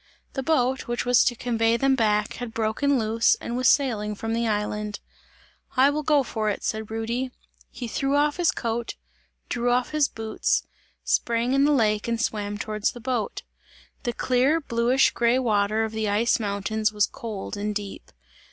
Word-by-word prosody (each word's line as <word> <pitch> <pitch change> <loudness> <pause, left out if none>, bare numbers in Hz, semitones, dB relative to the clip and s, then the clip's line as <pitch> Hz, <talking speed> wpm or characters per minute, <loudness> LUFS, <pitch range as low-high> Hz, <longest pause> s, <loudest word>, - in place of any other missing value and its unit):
The 270 - -2
boat, 265 -2 +1
which 240 0 -2
was 245 -1 +5
to 240 - +1
convey 230 -1 +1
them 270 +2 +3
back, 210 -3 +1
had 245 -2 -6
broken 230 +6 +1
loose 225 0 +3
and 235 - -5
was 255 0 +2
sailing 215 -7 +1
from 225 +2 -3
the 230 0 0
island. 210 -1 -2 0.8
"I 270 +2 +6
will 300 +1 -1
go 295 -2 +3
for 220 -3 -2
it!" 205 - -3
said 220 0 -3
Rudy. 230 +4 -2 0.4
He 245 - -6
threw 275 +4 -1
off 295 0 +2
his 350 -2 +2
coat, 230 0 -3 0.5
drew 240 +1 -1
off 245 0 +1
his 305 -2 +2
boots, 220 -1 -1 0.4
sprang 235 +2 +1
in 275 +1 +4
the 295 - +3
lake 215 -6 +2
and 230 -1 -1
swam 205 -2 -2
towards 215 0 -2
the 240 - -9
boat. 245 -2 -3 0.6
The 240 - -1
clear, 255 +6 +2
bluish 245 -1 +2
grey 235 +1 +2
water 215 -3 +1
of 220 - -3
the 220 -1 -2
ice 220 +4 +2
mountains, 215 +1 -1
was 210 -1 +2
cold 215 -4 -6
and 210 +1 -3
deep. 205 -1 -6
230 Hz, 180 wpm, -25 LUFS, 215-255 Hz, 0.8 s, I